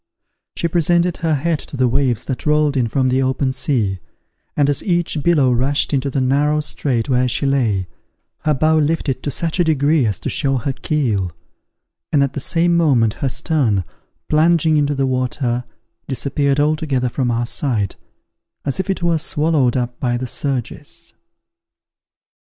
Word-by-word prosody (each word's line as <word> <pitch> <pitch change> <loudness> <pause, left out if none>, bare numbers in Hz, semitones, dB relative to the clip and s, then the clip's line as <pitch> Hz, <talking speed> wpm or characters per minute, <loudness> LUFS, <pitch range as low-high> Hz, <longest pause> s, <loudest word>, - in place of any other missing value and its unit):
She 170 - 0
presented 170 +1 +1
her 160 -2 0
head 155 +2 0
to 140 - -9
the 130 -1 +3
waves 125 -2 0
that 130 +3 -4
rolled 150 -1 +2
in 125 -3 +1
from 130 +3 +1
the 130 +1 +2
open 130 0 0
sea, 125 -8 -1 0.6
and 145 -2 +3
as 145 - 0
each 175 -5 0
billow 145 -6 +3
rushed 135 +5 0
into 140 0 0
the 135 - -1
narrow 145 +4 +2
strait 135 -5 -1
where 125 -2 +2
she 125 - 0
lay, 115 -9 +1 0.5
her 150 -1 0
bow 155 +3 +3
lifted 150 -3 0
to - - -3
such 165 +5 -2
a - - +5
degree 150 -3 +2
as 100 -4 -1
to - - -4
show 135 -2 +1
her 135 +3 -2
keel; 115 - -1 0.8
and 145 -3 +3
at 140 -1 -2
the 145 - -3
same 170 +4 +1
moment 130 -10 +3
her 135 - +1
stern, 125 - +1 0.4
plunging 160 0 +3
into 145 -1 +1
the 135 0 0
water, 125 -1 -1 0.4
disappeared 140 +1 0
altogether 145 -4 +1
from 125 +1 -1
our 120 0 0
sight, 115 -6 0 0.7
as 140 +3 -2
if 190 - -2
it 190 -2 -2
were 170 -2 +2
swallowed 150 -5 +1
up 120 -1 -3
by 120 -2 0
the 130 - -4
surges. 130 0 -4
140 Hz, 170 wpm, -19 LUFS, 125-155 Hz, 0.8 s, a